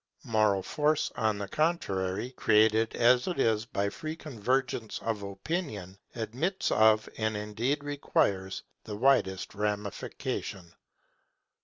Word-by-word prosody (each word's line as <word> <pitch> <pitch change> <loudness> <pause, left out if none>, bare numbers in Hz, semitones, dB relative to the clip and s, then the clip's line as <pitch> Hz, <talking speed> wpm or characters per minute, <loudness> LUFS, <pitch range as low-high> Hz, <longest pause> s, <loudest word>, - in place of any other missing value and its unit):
Moral 105 -4 +2
force, 150 +6 +1
on 110 -2 +1
the 100 -1 -4
contrary, 105 - -1
created 110 -2 +3
as 120 +1 +4
it 180 - -2
is 110 -2 +2
by 100 -3 -1
free 155 +7 -5
convergence 125 -4 -2
of 110 -2 -2
opinion, 100 - -4 0.2
admits 125 - -1
of, 110 0 +5
and 110 -1 0
indeed 115 +8 -1
requires, 100 -9 0 0.2
the 105 - -6
widest 105 -6 +2
ramification. 100 -3 -4
110 Hz, 115 wpm, -29 LUFS, 100-135 Hz, 0.2 s, of